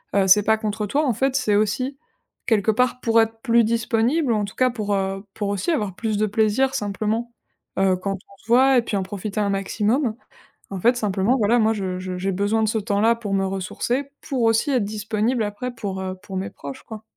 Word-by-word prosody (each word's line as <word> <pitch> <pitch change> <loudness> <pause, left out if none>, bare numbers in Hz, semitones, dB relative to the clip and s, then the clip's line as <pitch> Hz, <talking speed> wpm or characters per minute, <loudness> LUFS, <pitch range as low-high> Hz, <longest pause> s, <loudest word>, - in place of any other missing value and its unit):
heu, 195 -1 +3
c'est 205 +2 +6
pas 220 +1 +3
contre 215 0 -3
toi. 295 +8 +1
En 255 - +2
fait, 265 +4 0
c'est 215 -6 +2
aussi 235 +6 0 0.5
quelque 220 -2 +3
part 250 +2 +1
pour 230 -1 +3
être 225 0 -2
plus 235 -2 +4
disponible, 230 +5 +1
en 210 -2 0
tout 200 - -10
cas 255 0 +3
pour, 210 -4 -2
heu, 195 0 -2
pour 205 -1 -2
aussi 200 - -2
avoir 210 - -1
plus 215 0 -2
de 215 - +2
plaisir 220 +5 +1
simplement, 215 +1 -2 0.5
heu, 190 -1 +3
quand 195 +2 -3
on 195 +1 -16
se - - -23
voit 260 +3 +5
et - - +5
puis 225 - -4
en 195 - -1
profiter 200 +2 -5
un 200 - +1
maximum. 215 +5 0 0.6
En 195 - -4
fait, 240 +7 +3
simplement 210 +1 +1
voilà, 225 +2 +3
moi, 220 0 +3
je 190 -3 -3
je 185 0 -5
j'ai 195 +2 -1
besoin 205 +4 0
de - - +2
ce 220 - 0
temps-là 215 +2 +2
pour 215 -4 -5
me 195 0 +2
ressourcer, 235 +8 -2
pour 265 -5 -2
aussi 225 +5 +2
être 250 -5 +2
disponible 215 +3 -1
après 215 +4 -4
pour, 200 -5 -5
heu, 185 0 -4
pour 195 -2 -6
mes 190 - -3
proches, 140 -1 -9
quoi. 220 -1 -9
215 Hz, 225 wpm, -22 LUFS, 200-235 Hz, 0.6 s, c'est